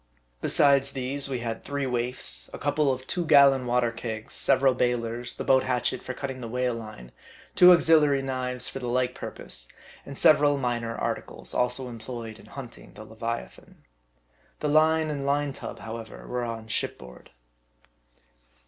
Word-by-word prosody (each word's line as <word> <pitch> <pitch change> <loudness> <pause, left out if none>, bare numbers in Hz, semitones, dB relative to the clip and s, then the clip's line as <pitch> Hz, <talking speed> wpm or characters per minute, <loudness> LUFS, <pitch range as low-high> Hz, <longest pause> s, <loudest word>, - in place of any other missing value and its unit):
Besides 140 -1 +4
these, 135 +1 -2
we 130 -3 -2
had 115 -1 -4
three 140 -1 -2
waifs, 120 - -3
a - - -6
cou 145 - 0
ple 145 -1 +2
of 130 0 -4
two 175 +5 -2
gallon 140 -4 +5
water 120 -1 +2
kegs, 115 -1 -6
several 135 -1 +3
bailers, 120 -1 -1
the - - -5
boat 130 -1 +4
hatchet 125 -1 -1
for 130 - -6
cutting 130 -2 -5
the 115 - -5
whale 125 +1 -1
line, 110 - -9 0.4
two 180 0 +8
auxiliary 155 -5 +5
knives 125 -1 -1
for 135 - -5
the 125 - -5
like 125 +1 0
purpose, - - -7 0.4
and 140 -1 -9
several 145 -1 +5
minor 120 -3 -2
articles, - - -5
also 125 +1 0
employed 115 -1 -7
in - - -16
hunt 135 -4 -9
ing - - -16
the 110 - -10
leviathan. 115 +2 -7 0.8
The 150 - -1
line 155 +1 +3
and 140 -2 -3
line 140 0 0
tub, - - -7
however, 115 0 -8
were 125 0 -3
on 115 -1 -5
ship 110 - -2
board. 65 0 -13
125 Hz, 165 wpm, -26 LUFS, 115-140 Hz, 0.8 s, two